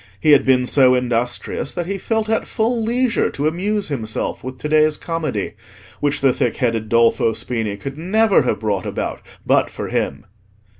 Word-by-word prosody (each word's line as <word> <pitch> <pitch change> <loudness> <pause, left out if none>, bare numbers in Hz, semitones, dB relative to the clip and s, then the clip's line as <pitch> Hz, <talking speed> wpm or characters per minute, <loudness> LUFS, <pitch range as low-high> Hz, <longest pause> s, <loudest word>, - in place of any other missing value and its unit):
He 155 - +3
had 145 - +5
been 130 -1 +4
so 130 -1 +4
industrious 125 +2 -1
that 175 -1 -3
he 195 +2 -3
felt 220 +1 -1
at 220 0 0
full 230 +1 0
leisure 240 +1 +1
to 145 +2 -2
amuse 195 +5 -1
himself 110 -6 -3
with 130 0 -6
to 150 - -4
day's 155 0 +3
comedy, 155 - -3 0.5
which 145 0 0
the 135 -2 +4
thick 120 -2 -1
headed 115 -4 -1
Dolfo 115 -1 +3
Spini 110 -5 -3
could 135 +8 -7
never 205 +5 +3
have 125 - -1
brought 100 -4 -2
about - - -4 0.2
but - - +3
for - - -6
him. - - -2
140 Hz, 180 wpm, -20 LUFS, 120-185 Hz, 0.5 s, had